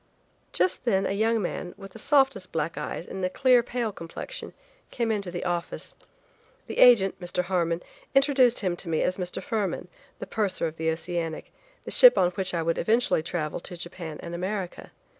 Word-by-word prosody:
Just 370 Hz, -, +1 dB
then 195 Hz, -5 st, +2 dB
a -, -, 0 dB
young 220 Hz, +3 st, +2 dB
man, 175 Hz, 0 st, -4 dB
with 195 Hz, -1 st, -10 dB
the 225 Hz, -, -8 dB
softest 270 Hz, -8 st, +2 dB
black 165 Hz, 0 st, -2 dB
eyes -, -, -4 dB
and 190 Hz, -, -6 dB
a 185 Hz, -, +1 dB
clear 250 Hz, +4 st, +4 dB
pale 235 Hz, -2 st, -2 dB
complexion, 165 Hz, -4 st, -7 dB, 0.4 s
came 235 Hz, -2 st, -1 dB
into 200 Hz, -4 st, -2 dB
the 175 Hz, 0 st, -5 dB
office. 175 Hz, -1 st, -3 dB, 0.7 s
The -, -, -5 dB
agent, 210 Hz, -8 st, +6 dB
Mr. 180 Hz, 0 st, -1 dB
Harmon, 175 Hz, -2 st, 0 dB, 0.3 s
introduced 270 Hz, -3 st, +4 dB
him 185 Hz, -3 st, 0 dB
to 175 Hz, -, -7 dB
me 160 Hz, -, +1 dB
as 185 Hz, -, -1 dB
Mr. 180 Hz, -1 st, -4 dB
Fuhrmann, 210 Hz, -9 st, -2 dB, 0.3 s
the -, -, -6 dB
purser 200 Hz, -5 st, 0 dB
of 160 Hz, 0 st, -4 dB
the 160 Hz, 0 st, 0 dB
Oceanic, 165 Hz, 0 st, -3 dB, 0.3 s
the -, -, -5 dB
ship -, -, +8 dB
on 180 Hz, -1 st, +4 dB
which 185 Hz, -1 st, -2 dB
I 165 Hz, -, 0 dB
would 165 Hz, 0 st, 0 dB
eventually 230 Hz, -6 st, +2 dB
travel 160 Hz, -2 st, -3 dB
to 175 Hz, +1 st, -8 dB
Japan 170 Hz, -2 st, -7 dB
and 170 Hz, -, -6 dB
America. 185 Hz, +1 st, -4 dB
185 Hz, 185 wpm, -27 LUFS, 170-225 Hz, 0.7 s, ship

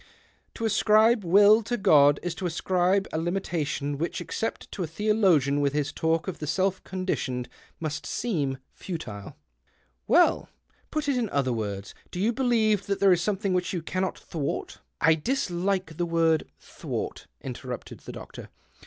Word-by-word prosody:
To 230 Hz, -, -3 dB
ascribe 220 Hz, +1 st, +4 dB
will 205 Hz, +5 st, +6 dB
to 240 Hz, +3 st, -2 dB
God 145 Hz, -8 st, +5 dB
is 175 Hz, -1 st, -2 dB
to 180 Hz, +1 st, -3 dB
ascribe 185 Hz, +3 st, +1 dB
a 160 Hz, -, 0 dB
limitation 160 Hz, -5 st, -2 dB
which, 170 Hz, -, -2 dB
except 225 Hz, -, -4 dB
to 195 Hz, -, -5 dB
a 170 Hz, -, -1 dB
theologian 165 Hz, -7 st, +2 dB
with 140 Hz, -1 st, +1 dB
his 145 Hz, -1 st, -1 dB
talk 165 Hz, +2 st, 0 dB
of 190 Hz, -, -4 dB
the 150 Hz, -, -5 dB
self 190 Hz, +4 st, 0 dB
conditioned, 140 Hz, -10 st, -3 dB, 0.3 s
must 155 Hz, -2 st, -4 dB
seem 150 Hz, -, -1 dB, 0.2 s
futile." 110 Hz, -, -7 dB, 0.4 s
" 60 Hz, -2 st, -42 dB
Well, -, -, +4 dB, 0.4 s
put 305 Hz, -2 st, -2 dB
it 280 Hz, -3 st, +2 dB
in 230 Hz, -4 st, -1 dB
other 135 Hz, -5 st, 0 dB
words: 105 Hz, -3 st, -4 dB, 0.2 s
Do 180 Hz, -, -6 dB
you 220 Hz, +5 st, +2 dB
believe 220 Hz, -6 st, +2 dB
that 200 Hz, -1 st, -1 dB
there 195 Hz, -2 st, +6 dB
is 175 Hz, -, +1 dB
something 200 Hz, 0 st, 0 dB
which 180 Hz, +1 st, 0 dB
you 175 Hz, -3 st, -3 dB
cannot 185 Hz, +2 st, -2 dB
thwart 150 Hz, -5 st, -4 dB
" -, -, -48 dB
" -, -, -52 dB
I -, -, +7 dB
dislike 180 Hz, -, -1 dB
the 175 Hz, -, 0 dB
word 165 Hz, -1 st, +2 dB
' -, -, -44 dB
thwart,' -, -, -6 dB
" -, -, -48 dB
interrupted -, -, -7 dB
the -, -, -9 dB
doctor. -, -, -10 dB
180 Hz, 175 wpm, -27 LUFS, 150-200 Hz, 0.4 s, I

